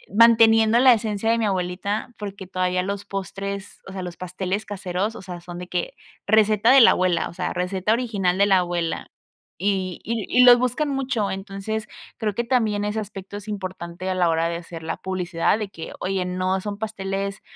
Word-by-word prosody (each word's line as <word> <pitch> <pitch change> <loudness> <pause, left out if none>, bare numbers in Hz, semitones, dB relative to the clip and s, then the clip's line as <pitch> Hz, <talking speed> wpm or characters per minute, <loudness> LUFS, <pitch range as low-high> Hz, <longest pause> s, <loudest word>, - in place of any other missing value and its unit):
manteniendo 225 0 +6
la 255 0 +8
esencia 220 -1 -1
de 230 - +2
mi 230 - 0
abuelita, 195 +4 -2
porque 200 -2 -7
todavía 185 0 0
los 200 +1 -3
postres, 200 0 -6
o - - -8
sea, 190 0 -5
los 175 -1 -6
pasteles 185 +3 -3
caseros, 195 +2 -3
o - - -9
sea, 180 -2 -8
son 175 0 -9
de 180 - -7
que 180 -1 -3 0.3
receta 215 +1 +4
de 270 - +8
la 235 - +8
abuela, 180 -2 +1
o - - -11
sea, 180 +1 -3
receta 185 +3 -1
original 210 -7 +1
de 200 - +5
la 195 -2 +4
abuela 175 -2 -2 0.5
y 190 -1 -1
y 225 0 -2
y 250 - +5
los 245 -1 +9
buscan 255 +5 0
mucho. 270 -6 -1
Entonces, 195 +3 -4 0.3
creo 215 -3 -1
que 235 - -1
también 220 -4 +1
ese 210 +1 -1
aspecto 200 -1 -8
es 205 +1 -9
importante 185 -2 -5
a 185 - 0
la 175 -2 +3
hora 165 0 +1
de 170 - -2
hacer 170 -1 -9
la 160 - -3
publicidad, 185 +1 0
de 210 - -3
que: 165 -4 -8
"Oye, 190 0 -1
no 185 +1 -1
son 205 +1 -5
pasteles 195 -2 -4
195 Hz, 200 wpm, -23 LUFS, 185-215 Hz, 0.5 s, los